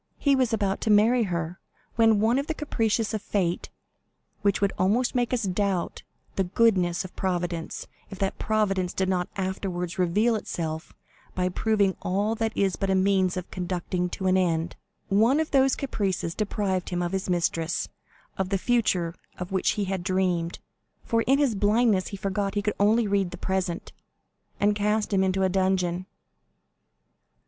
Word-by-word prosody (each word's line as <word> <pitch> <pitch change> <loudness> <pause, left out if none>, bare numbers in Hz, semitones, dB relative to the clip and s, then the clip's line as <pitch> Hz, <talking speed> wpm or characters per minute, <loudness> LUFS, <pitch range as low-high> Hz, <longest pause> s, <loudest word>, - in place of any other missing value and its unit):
He 280 -1 +3
was 255 -3 +1
about 200 -3 0
to - - -1
marry 220 +3 +5
her, 170 -1 -3 0.4
when 225 -2 +4
one 230 +5 +3
of 280 - -3
the 320 - -2
caprices 225 -7 0
of 215 - -2
fate,—which 195 +1 -3
would 200 -1 +1
almost 215 +7 +2
make 245 -2 0
us 250 -2 0
doubt 195 -1 -1 0.4
the 195 - +3
goodness 185 -3 +2
of 185 - -11
Providence, 175 -3 -2 0.2
if 195 - -8
that 195 0 -2
Providence 195 -4 0
did 190 - 0
not 180 -1 0
afterwards 185 -2 -3
reveal 210 +7 +2
itself 160 -6 -4 0.4
by 180 0 +1
proving 205 +1 +2
that - - -14
all 205 +5 0 0.2
is 195 -2 +1
but 195 - -1
a 190 - +3
means 190 -1 +2
of 180 - -6
conducting 180 0 -2
to 190 - -5
an 185 0 +4
end,—one 195 - 0
of 315 - -1
those 270 -1 +4
caprices 195 -10 -2
deprived 200 -3 -1
him 175 0 -1
of 175 - -2
his 190 -1 -2
mistress, 170 -1 0 0.5
of 190 -1 0
the 195 - +1
future 185 -7 +1 0.2
of 180 +1 -6
which 190 -1 +1
he 210 - -1
had 190 -1 -2
dreamed 180 -3 0 0.5
(for 230 0 +1
in 270 +2 +5
his 280 -5 +2
blindness 210 -1 +2
he 200 - -6
forgot 195 +1 -2
he 205 - 0
could 210 - 0
only 215 +3 +4
read 200 -2 +1
the 180 - -8
present), 185 -2 -2 0.7
and 205 +1 +3
cast 210 +1 0
him 190 -1 +3
into 190 0 +1
a - - +4
dungeon." 185 -1 0
195 Hz, 170 wpm, -26 LUFS, 180-215 Hz, 0.7 s, marry